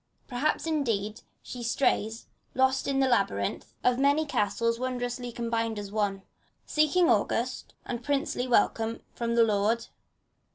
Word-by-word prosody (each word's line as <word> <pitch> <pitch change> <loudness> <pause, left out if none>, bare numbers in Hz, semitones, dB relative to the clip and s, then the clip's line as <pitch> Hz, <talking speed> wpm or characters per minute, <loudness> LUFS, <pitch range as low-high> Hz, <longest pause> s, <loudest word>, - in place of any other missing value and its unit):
Perhaps, 280 +6 0
indeed, 230 -9 -1 0.2
she 250 - -7
strays, 230 -2 0 0.3
lost 265 +1 +2
in 275 -1 +1
the 265 - +4
labyrinth 100 - 0
Of 250 0 +3
many 285 +3 +3
castles 230 -2 0
wondrously 245 -1 -3
combined 230 -1 -2
in 205 -1 -6
one. 200 -2 -1 0.4
Seeking 310 +4 +3
august - - 0
and 240 -1 -4
princely 280 -2 -1
welcome 230 -1 +1
from 235 -1 -2
the 235 - +6
lord. 220 +2 +1
235 Hz, 130 wpm, -28 LUFS, 220-265 Hz, 0.4 s, the